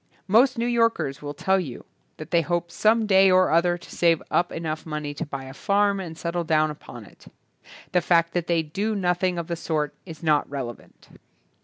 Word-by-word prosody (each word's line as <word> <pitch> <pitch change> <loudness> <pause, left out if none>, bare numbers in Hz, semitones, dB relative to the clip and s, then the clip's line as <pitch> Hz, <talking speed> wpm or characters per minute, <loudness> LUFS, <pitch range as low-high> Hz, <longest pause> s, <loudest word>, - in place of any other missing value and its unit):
Most 245 +6 +4
New 230 - 0
Yorkers 230 - +1
will 145 0 -6
tell 190 +6 +1
you 140 -10 -7 0.3
that 155 +1 -9
they 170 -1 +4
hope 175 +1 -2
THE - - -16
BOOKMAN - - -13
some 220 +1 +4
day 195 -2 +5
or 185 0 +4
other 175 +2 +3
to - - -13
save 165 -2 +2
up 175 - +1
enough 155 -1 -4
money 150 -2 -5
to 145 +2 -5
buy 140 -2 -6
a 130 0 -9
farm 200 +6 +1
and 165 -4 -7
settle 170 0 -2
down 155 -1 +2
upon 120 -6 -11
it. - - -19 0.6
The 180 - +2
fact 170 -1 +2
that 175 -2 -1
they 170 -2 +1
do 200 +8 -2
nothing 180 -1 0
of 170 - -3
the 170 - -3
sort 155 -3 -2
is 160 -1 -10
not 150 -2 +2
relevant. 130 -4 -8
170 Hz, 210 wpm, -24 LUFS, 155-190 Hz, 0.6 s, day